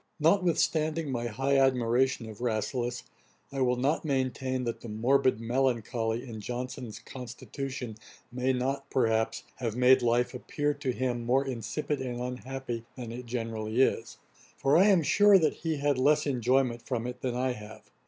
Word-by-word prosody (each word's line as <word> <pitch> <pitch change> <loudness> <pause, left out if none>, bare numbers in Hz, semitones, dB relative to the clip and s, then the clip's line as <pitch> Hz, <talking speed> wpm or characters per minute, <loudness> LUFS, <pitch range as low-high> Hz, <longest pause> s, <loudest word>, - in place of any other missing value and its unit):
Notwithstanding 160 -3 +2
my 120 -2 -2
high 135 +4 +1
admiration 130 -1 +2
of 110 0 -10
Rasselas, 120 +1 -1 0.5
I 135 -1 -3
will 125 -1 +3
not 135 +5 0
maintain 130 -2 -1
that 115 -1 -3
the 120 - -8
'morbid 125 +3 +2
melancholy' 120 -1 -1
in 110 -3 -7
Johnson's 125 0 -5
constitution 125 -1 -7 0.3
may 125 +2 0
not, 135 +2 -2
perhaps, 110 -3 +1
have 115 -4 -3
made 125 +1 +5
life 120 +1 +2
appear 145 +3 -1
to 140 -2 -2
him 125 -1 -2
more 130 +4 +2
insipid 135 +4 -3
and 125 -2 -4
unhappy 125 -1 -5
than 120 -3 -6
it 120 +1 -7
generally 115 -1 -3
is; 135 - +1 0.4
for 135 +1 +2
I 185 - +7
am 190 -5 +5
sure 205 +5 +6
that 160 -4 +2
he 160 -2 -3
had 145 -2 +1
less 150 +3 +3
enjoyment 125 -2 +1
from 120 -2 -3
it 125 0 -6
than 125 -2 -2
I 130 +1 0
have. 105 -1 -12
125 Hz, 160 wpm, -29 LUFS, 120-135 Hz, 0.5 s, I